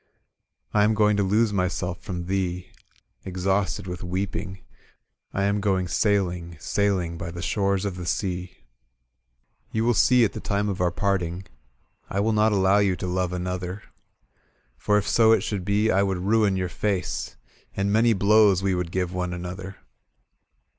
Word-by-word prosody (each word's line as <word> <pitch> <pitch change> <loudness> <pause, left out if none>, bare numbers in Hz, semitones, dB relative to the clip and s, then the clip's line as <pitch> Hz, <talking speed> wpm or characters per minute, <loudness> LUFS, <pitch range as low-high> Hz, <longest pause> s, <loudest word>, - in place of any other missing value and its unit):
"/ - - -46
am 105 +1 +3
going 105 -1 +3
to 100 - +1
lose 105 +3 +2
myself 90 -2 -2
from 90 -2 -5
thee. 90 -1 -2 0.5
Exhausted 95 +1 -1
with 90 -1 -6
weeping; 95 +1 -4 0.7
I 95 - -1
am 100 +1 +1
going 95 -2 +1
sailing, 90 -4 0
saiUng, 90 0 -1
By 85 - -4
the 85 +1 -7
shores 100 0 0
of 95 -3 -3
the 90 -1 -6
sea. 90 - -3 1.1
*^You 110 - +1
wHl 120 0 +2
see 125 +1 +5
at 100 - -2
the - - -5
time 100 0 -1
of 95 -2 -3
our 90 - +3
parting 90 0 -1 0.6
I - - -4
wiU 110 +2 +1
not 110 +1 +3
allow 100 0 +3
you 100 -2 +2
to 90 - -5
love 90 0 -1
another. 90 +2 -4 0.9
For 105 +10 +1
if 105 0 -1
so 110 +1 +5
it 110 - +3
should 100 -4 -3
be, 105 +3 +2
I 95 - +3
would 95 -2 0
ruin 100 +1 +2
your 90 -1 -1
face. 90 -1 -2 0.4
And 100 +1 0
many 115 +1 +4
blows 100 -1 +4
we 95 -1 +1
would 90 -1 -2
give 90 -1 -2
one 90 -1 -2
another. 95 +2 -6
95 Hz, 165 wpm, -25 LUFS, 90-105 Hz, 1.1 s, see